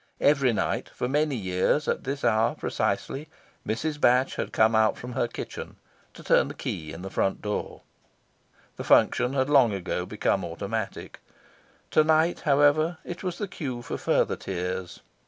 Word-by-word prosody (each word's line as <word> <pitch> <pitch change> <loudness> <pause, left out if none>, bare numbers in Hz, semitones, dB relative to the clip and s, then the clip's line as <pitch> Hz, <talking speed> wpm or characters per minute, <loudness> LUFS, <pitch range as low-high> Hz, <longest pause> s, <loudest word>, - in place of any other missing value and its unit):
Every 140 -3 +4
night, 110 - -1
for 125 - -3
many 150 +1 +1
years, 95 +8 0
at - - -1
this 140 +2 -3
hour 110 0 +2
precisely, 145 +3 -2 0.4
Mrs. 150 +8 -2
Batch 125 +2 +3
had - - -3
come 110 +1 +3
out 110 0 +3
from 125 - -7
her 120 -1 0
kitchen, 115 - -7 0.4
to - - -12
turn - - +3
the - - -8
key 75 -1 -5
in 85 +3 -8
the 95 - -6
front 95 - 0
door. 105 0 -4 1.0
The - - -5
function 125 +2 +3
had 130 -1 +1
long 135 -7 +5
ago 90 -1 -3
become 100 -2 0
automatic. 100 +5 -5 0.7
To 155 - +5
night, 160 +2 +3
however, 150 +3 +3
it 175 - -7
was 180 -2 -3
the 205 - -3
cue 130 -9 -5
for - - -5
further - - +1
tears. 90 -1 -5
125 Hz, 165 wpm, -26 LUFS, 100-145 Hz, 1.0 s, long